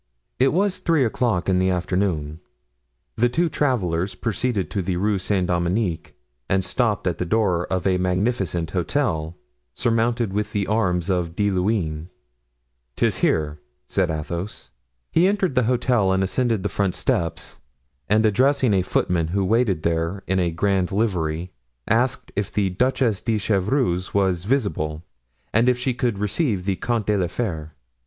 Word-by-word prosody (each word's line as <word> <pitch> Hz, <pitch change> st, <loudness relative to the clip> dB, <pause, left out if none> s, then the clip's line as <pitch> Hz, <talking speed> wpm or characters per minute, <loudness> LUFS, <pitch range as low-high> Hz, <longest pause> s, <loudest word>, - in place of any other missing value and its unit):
It 130 Hz, +1 st, +4 dB
was 195 Hz, +3 st, +1 dB
three 160 Hz, -6 st, +2 dB
o'clock 115 Hz, -5 st, 0 dB
in 95 Hz, -1 st, +3 dB
the 95 Hz, 0 st, +2 dB
afternoon. 90 Hz, -4 st, -1 dB, 0.8 s
The 120 Hz, +2 st, +3 dB
two 165 Hz, +7 st, +1 dB
travelers 95 Hz, -, 0 dB
proceeded 115 Hz, -3 st, -1 dB
to 100 Hz, -, -1 dB
the 90 Hz, 0 st, -2 dB
Rue 100 Hz, +1 st, +1 dB
Saint 95 Hz, 0 st, 0 dB
Dominique 90 Hz, 0 st, -1 dB, 0.3 s
and 95 Hz, -1 st, +2 dB
stopped 110 Hz, -3 st, 0 dB
at 90 Hz, -3 st, -1 dB
the -, -, +1 dB
door 90 Hz, -3 st, +1 dB
of 95 Hz, -1 st, -2 dB
a 95 Hz, -1 st, +2 dB
magnificent 90 Hz, -3 st, 0 dB
hotel, 85 Hz, -, -1 dB, 0.4 s
surmounted 115 Hz, -2 st, +1 dB
with 105 Hz, +1 st, -2 dB
the 100 Hz, -2 st, 0 dB
arms 90 Hz, -6 st, 0 dB
of 85 Hz, -2 st, -1 dB
De 105 Hz, 0 st, +1 dB
Luynes. 90 Hz, -5 st, -1 dB, 0.9 s
"'Tis -, -, +1 dB
here," 75 Hz, -1 st, 0 dB, 0.3 s
said 95 Hz, -3 st, +1 dB
Athos. 85 Hz, +5 st, -5 dB, 0.4 s
He 175 Hz, +3 st, +4 dB
entered 195 Hz, -6 st, +1 dB
the 125 Hz, -2 st, +2 dB
hotel 120 Hz, -5 st, +2 dB
and 95 Hz, 0 st, +2 dB
ascended 115 Hz, +1 st, 0 dB
the -, -, +1 dB
front 100 Hz, -3 st, -1 dB
steps, 85 Hz, -1 st, -1 dB, 0.5 s
and 110 Hz, +2 st, +4 dB
addressing 130 Hz, +2 st, +3 dB
a 95 Hz, -, +3 dB
footman 90 Hz, -2 st, 0 dB
who 95 Hz, +3 st, 0 dB
waited 105 Hz, -5 st, +1 dB
there 85 Hz, +3 st, -1 dB
in 95 Hz, 0 st, 0 dB
a 90 Hz, -1 st, +1 dB
grand 95 Hz, +2 st, 0 dB
livery, 90 Hz, -5 st, -1 dB, 0.4 s
asked 125 Hz, +3 st, +1 dB
if 105 Hz, -2 st, -2 dB
the 100 Hz, -3 st, 0 dB
Duchess 120 Hz, 0 st, +1 dB
de 110 Hz, -1 st, 0 dB
Chevreuse 100 Hz, -2 st, 0 dB
was 95 Hz, -3 st, +1 dB
visible 85 Hz, -, -1 dB, 0.5 s
and 115 Hz, +3 st, +4 dB
if 125 Hz, -, +2 dB
she 125 Hz, +1 st, -1 dB
could 120 Hz, -3 st, -1 dB
receive 105 Hz, -, -1 dB
the 95 Hz, -2 st, 0 dB
Comte 115 Hz, -3 st, -1 dB
de 105 Hz, -, +2 dB
la 90 Hz, -, +1 dB
Fere? 80 Hz, -6 st, -4 dB
100 Hz, 160 wpm, -23 LUFS, 90-115 Hz, 0.9 s, It